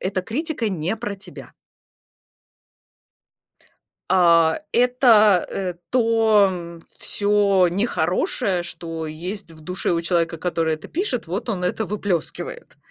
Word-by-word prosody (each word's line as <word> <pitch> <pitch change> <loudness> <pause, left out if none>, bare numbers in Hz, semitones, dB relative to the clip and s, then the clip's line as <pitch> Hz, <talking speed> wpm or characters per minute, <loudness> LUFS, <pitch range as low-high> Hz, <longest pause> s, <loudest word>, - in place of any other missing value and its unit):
эта 185 0 -2
критика 255 - -3
не 185 +3 -2
про 205 - -4
тебя. 190 -2 -11 2.6
А 170 -2 +4
это, 235 -6 +4
э, 185 -3 -3 0.2
то 210 -8 +2 0.2
всё 200 -3 +2
нехорошее, 180 -1 0
что 165 -2 -5
есть 175 +5 -6
в 160 -1 -14
душе 180 +1 -2
у 170 0 0
человека, 170 -1 0
который 165 -1 -1
это 155 - -11
пишет, 295 - -2
вот 195 +8 -4
он 185 -5 -2
это 215 +4 -1
выплёскивает. 195 -5 -4
185 Hz, 110 wpm, -22 LUFS, 170-215 Hz, 2.6 s, А